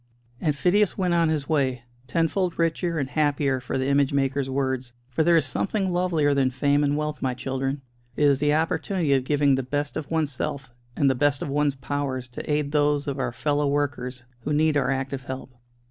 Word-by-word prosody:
And 150 Hz, -2 st, 0 dB
Phidias 185 Hz, +7 st, +2 dB
went 180 Hz, -3 st, +1 dB
on 170 Hz, -1 st, +3 dB
his 150 Hz, -3 st, -1 dB
way, 130 Hz, -6 st, 0 dB, 0.2 s
tenfold 165 Hz, +6 st, 0 dB
richer 165 Hz, 0 st, 0 dB
and 140 Hz, -4 st, -1 dB
happier 145 Hz, -2 st, +1 dB
for 125 Hz, +1 st, -3 dB
the 130 Hz, -, -1 dB
image 140 Hz, -1 st, +3 dB
maker's 135 Hz, -1 st, 0 dB
words. 130 Hz, -2 st, -2 dB, 0.2 s
For 130 Hz, -, 0 dB
there 170 Hz, +1 st, +5 dB
is 160 Hz, -, +2 dB
something 195 Hz, -2 st, -1 dB
lovelier 175 Hz, -5 st, +2 dB
than 135 Hz, -2 st, +2 dB
fame 145 Hz, +3 st, +1 dB
and 145 Hz, 0 st, +1 dB
wealth, 150 Hz, 0 st, -3 dB
my 130 Hz, -2 st, -1 dB
children; 135 Hz, +2 st, -3 dB, 0.3 s
it 150 Hz, -, 0 dB
is 140 Hz, -2 st, +4 dB
the 145 Hz, +1 st, +2 dB
opportunity 160 Hz, 0 st, 0 dB
of 130 Hz, -2 st, +1 dB
giving 145 Hz, -1 st, +3 dB
the 135 Hz, -, +1 dB
best 145 Hz, +3 st, -2 dB
of 155 Hz, -3 st, -4 dB
one's 160 Hz, -3 st, 0 dB
self 135 Hz, -1 st, -4 dB, 0.2 s
and 140 Hz, -, +2 dB
the 135 Hz, -, +4 dB
best 140 Hz, +2 st, +1 dB
of -, -, -4 dB
one's 145 Hz, 0 st, +1 dB
powers 130 Hz, -1 st, -3 dB
to 125 Hz, -, -6 dB
aid 150 Hz, -1 st, 0 dB
those 145 Hz, -1 st, +2 dB
of 140 Hz, -1 st, -3 dB
our 130 Hz, -, -1 dB
fellow 145 Hz, +4 st, 0 dB
workers 135 Hz, -3 st, -2 dB, 0.2 s
who 135 Hz, +5 st, -4 dB
need 155 Hz, +1 st, +3 dB
our 140 Hz, -3 st, +2 dB
active 135 Hz, 0 st, -2 dB
help. 130 Hz, 0 st, -6 dB
145 Hz, 210 wpm, -25 LUFS, 135-155 Hz, 0.3 s, there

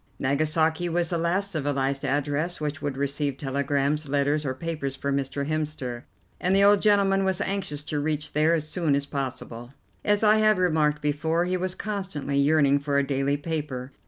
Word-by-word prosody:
Nagasaki 155 Hz, +5 st, +1 dB
was 170 Hz, 0 st, 0 dB
the 170 Hz, -, 0 dB
last 185 Hz, +4 st, 0 dB
civilized 140 Hz, -3 st, -1 dB
address 145 Hz, +4 st, -1 dB
which 150 Hz, 0 st, -3 dB
would 145 Hz, -2 st, -3 dB
receive 140 Hz, 0 st, -2 dB
telegrams, 140 Hz, +2 st, -1 dB
letters 145 Hz, +1 st, +1 dB
or 130 Hz, -, -2 dB
papers 150 Hz, -3 st, -4 dB
for 140 Hz, 0 st, -2 dB
Mr. 140 Hz, +1 st, -2 dB
Hemster, 150 Hz, -6 st, -3 dB, 0.3 s
and 185 Hz, +2 st, +2 dB
the 200 Hz, -, +5 dB
old 205 Hz, 0 st, +6 dB
gentleman 200 Hz, -2 st, +3 dB
was 190 Hz, -2 st, 0 dB
anxious 180 Hz, -7 st, -2 dB
to 150 Hz, 0 st, -3 dB
reach 150 Hz, 0 st, -2 dB
there 155 Hz, +3 st, +3 dB
as 155 Hz, -2 st, -3 dB
soon 155 Hz, -3 st, 0 dB
as 140 Hz, 0 st, -1 dB
possible. 130 Hz, -3 st, -5 dB, 0.3 s
As 205 Hz, +1 st, +2 dB
I 215 Hz, 0 st, +6 dB
have 215 Hz, -2 st, +4 dB
remarked 155 Hz, -4 st, +1 dB
before, 160 Hz, +4 st, 0 dB
he 180 Hz, +1 st, -1 dB
was 185 Hz, 0 st, -2 dB
constantly 185 Hz, -10 st, -3 dB
yearning 140 Hz, -1 st, +4 dB
for 140 Hz, 0 st, -1 dB
a 140 Hz, -, +2 dB
daily 140 Hz, +1 st, 0 dB
paper. 145 Hz, -4 st, -4 dB
150 Hz, 180 wpm, -26 LUFS, 140-170 Hz, 0.3 s, old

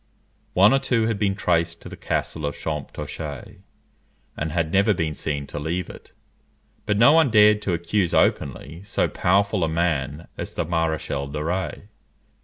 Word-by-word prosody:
One 100 Hz, +6 st, +6 dB
or 135 Hz, -, +4 dB
two 125 Hz, -4 st, +1 dB
had 110 Hz, -2 st, -1 dB
been 100 Hz, -2 st, +1 dB
traced 85 Hz, -3 st, 0 dB
to -, -, -9 dB
the -, -, -8 dB
castle 80 Hz, -, -3 dB
of 70 Hz, -, -4 dB
Champtocé, 75 Hz, -1 st, -6 dB, 0.8 s
and 75 Hz, +1 st, -3 dB
had 80 Hz, -1 st, -1 dB
never 100 Hz, +2 st, +4 dB
been 80 Hz, -3 st, -1 dB
seen 70 Hz, -1 st, -3 dB
to 75 Hz, -, -6 dB
leave 85 Hz, +4 st, -3 dB
it; -, -, -15 dB, 0.8 s
but 105 Hz, -, +1 dB
no 120 Hz, +7 st, +7 dB
one 160 Hz, -4 st, +5 dB
dared 105 Hz, -1 st, +5 dB
to 95 Hz, -4 st, -1 dB
accuse 85 Hz, +2 st, 0 dB
openly 75 Hz, +5 st, 0 dB
so 100 Hz, -, 0 dB
powerful 100 Hz, +1 st, +1 dB
a 80 Hz, -, +1 dB
man 80 Hz, -2 st, -1 dB
as -, -, -6 dB
the -, -, -1 dB
Maréchal 80 Hz, -4 st, -2 dB
de 75 Hz, +1 st, -3 dB
Rays. 90 Hz, +5 st, -3 dB
85 Hz, 170 wpm, -23 LUFS, 80-100 Hz, 0.8 s, no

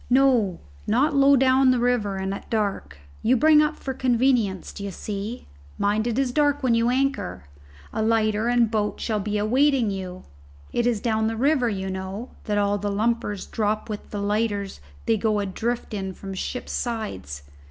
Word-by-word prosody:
"No, 245 Hz, -8 st, +3 dB, 0.3 s
not 265 Hz, +8 st, +2 dB
low 280 Hz, 0 st, +6 dB
down 260 Hz, 0 st, +4 dB
the 255 Hz, -, +4 dB
river 240 Hz, -5 st, +1 dB
and 190 Hz, 0 st, -2 dB
at 200 Hz, -, -8 dB
dark. 200 Hz, -, -2 dB, 0.2 s
You 255 Hz, +3 st, +3 dB
bring 305 Hz, +4 st, +6 dB
up 305 Hz, 0 st, +1 dB
for 265 Hz, -, -5 dB
convenience, 245 Hz, -7 st, +1 dB
d'ye 200 Hz, 0 st, -5 dB
see. 205 Hz, +4 st, -5 dB, 0.3 s
Mind 210 Hz, +3 st, +1 dB
it 235 Hz, 0 st, -1 dB
is 270 Hz, -2 st, +1 dB
dark 290 Hz, 0 st, +2 dB
when 250 Hz, -2 st, +3 dB
you 230 Hz, +1 st, +3 dB
anchor. 255 Hz, -, -1 dB, 0.5 s
A -, -, -1 dB
lighter 220 Hz, 0 st, +2 dB
and 240 Hz, -2 st, +3 dB
boat 210 Hz, -2 st, -1 dB
shall 215 Hz, -2 st, -1 dB
be 210 Hz, +1 st, -2 dB
awaiting 250 Hz, +2 st, +2 dB
you. 185 Hz, -1 st, -6 dB, 0.5 s
It 240 Hz, 0 st, +1 dB
is 230 Hz, -4 st, 0 dB
down 220 Hz, -2 st, +1 dB
the 225 Hz, 0 st, -2 dB
river, 265 Hz, -1 st, +2 dB
you 190 Hz, -2 st, -3 dB
know, 190 Hz, +5 st, -5 dB, 0.2 s
that 210 Hz, -2 st, 0 dB
all 205 Hz, 0 st, +1 dB
the 205 Hz, -, -2 dB
lumpers 210 Hz, -1 st, -1 dB
drop 215 Hz, 0 st, -2 dB
with 210 Hz, -, -6 dB
the 205 Hz, -, -4 dB
lighters 205 Hz, -1 st, -1 dB, 0.3 s
they 225 Hz, -, +2 dB
go 215 Hz, 0 st, +1 dB
adrift 220 Hz, +5 st, -2 dB
in 190 Hz, -2 st, -4 dB
from 195 Hz, -1 st, -7 dB
ships' 245 Hz, +6 st, -4 dB
sides. 95 Hz, -, -4 dB
220 Hz, 180 wpm, -24 LUFS, 200-250 Hz, 0.5 s, low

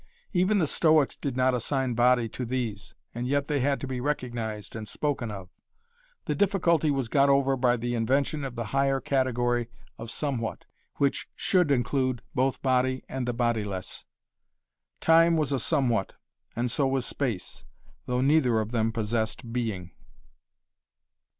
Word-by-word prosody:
Even 185 Hz, +3 st, +3 dB
the 175 Hz, -, +3 dB
Stoics 155 Hz, -1 st, +3 dB
did 135 Hz, -3 st, -4 dB
not 130 Hz, 0 st, +3 dB
assign 130 Hz, +1 st, 0 dB
body 120 Hz, 0 st, +3 dB
to 125 Hz, -, -5 dB
these, 115 Hz, -5 st, -4 dB, 0.2 s
and 120 Hz, +1 st, -3 dB
yet 140 Hz, +1 st, 0 dB
they 145 Hz, -1 st, 0 dB
had 140 Hz, +1 st, +1 dB
to -, -, -3 dB
be 130 Hz, -2 st, -4 dB
recognized 120 Hz, -7 st, -3 dB
and 110 Hz, -1 st, -6 dB
spoken 140 Hz, -4 st, -2 dB
of. 95 Hz, -3 st, -8 dB, 0.7 s
The -, -, 0 dB
difficulty 175 Hz, -5 st, +2 dB
was 135 Hz, -4 st, 0 dB
got 140 Hz, +3 st, +3 dB
over 135 Hz, -1 st, +3 dB
by 125 Hz, -1 st, +2 dB
the 120 Hz, +1 st, -2 dB
invention 140 Hz, +6 st, 0 dB
of 130 Hz, -3 st, -5 dB
the 115 Hz, -, -3 dB
higher 135 Hz, 0 st, +2 dB
category 120 Hz, -3 st, 0 dB, 0.3 s
of 115 Hz, -, -7 dB
somewhat, 125 Hz, -5 st, -3 dB, 0.3 s
which 140 Hz, -1 st, 0 dB
should 180 Hz, -5 st, +2 dB
include 130 Hz, -1 st, 0 dB
both 130 Hz, -1 st, 0 dB
body 130 Hz, 0 st, +1 dB
and 130 Hz, -2 st, -4 dB
the 120 Hz, -, 0 dB
bodiless. 110 Hz, -6 st, -2 dB, 1.0 s
Time 165 Hz, +1 st, +5 dB
was 150 Hz, -3 st, 0 dB
a 135 Hz, -, +1 dB
somewhat, 120 Hz, -, 0 dB, 0.4 s
and 120 Hz, +1 st, -1 dB
so 140 Hz, +2 st, +1 dB
was 130 Hz, -2 st, 0 dB
space, 105 Hz, -, -3 dB, 0.4 s
though 125 Hz, 0 st, 0 dB
neither 135 Hz, -5 st, +3 dB
of 110 Hz, +1 st, -3 dB
them 115 Hz, -2 st, +1 dB
possessed 115 Hz, +1 st, -2 dB
being. 105 Hz, -8 st, -3 dB
130 Hz, 155 wpm, -27 LUFS, 115-140 Hz, 1.0 s, Time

